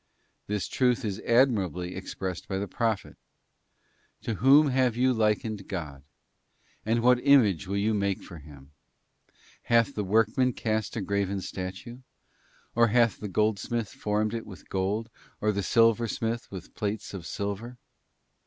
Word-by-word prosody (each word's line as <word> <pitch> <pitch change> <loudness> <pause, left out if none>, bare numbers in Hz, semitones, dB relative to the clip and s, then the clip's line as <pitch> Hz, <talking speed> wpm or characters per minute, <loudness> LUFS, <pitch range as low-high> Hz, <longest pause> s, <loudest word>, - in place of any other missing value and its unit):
'This 105 -2 -2
truth 125 -1 +1
is 100 -2 -3
admirably 100 - +2
ex 95 - -7
_ - - -37
pressed 95 -3 -4
by 95 - -2
the 100 +1 -3
Prophet: 110 +1 -2 1.1
'To 115 - -2
whom 135 +8 +6
then 135 -3 -1
have 130 -3 +2
you 130 +1 +3
likened 110 -1 0
_ - - -24
God? 75 -8 -5 0.9
or 115 +1 +2
what 125 +1 +4
image 110 - +4
will 100 +1 -2
you 105 +2 +1
make 100 -2 -1
for 85 -4 -10
Him? 70 -2 -15 0.9
Hath 115 +3 +3
the 105 - -2
_ - - -8
workman 115 +5 +2
cast 110 -3 -2
a 115 - -2
graven 100 0 -1
statue? 95 +6 -6 0.7
or 120 0 +4
hath 115 0 +2
the 105 - -5
goldsmith 110 +2 0
formed 105 +2 -1
_ - - -8
it 115 - -5
with 95 - -12
gold, 100 +4 -2 0.3
or 105 - +1
the 100 -1 -2
silversmith 115 +2 +1
with 95 -2 -9
plates 105 0 -4
of 90 -3 -7
silver? 100 +5 -4
105 Hz, 160 wpm, -27 LUFS, 95-115 Hz, 1.1 s, whom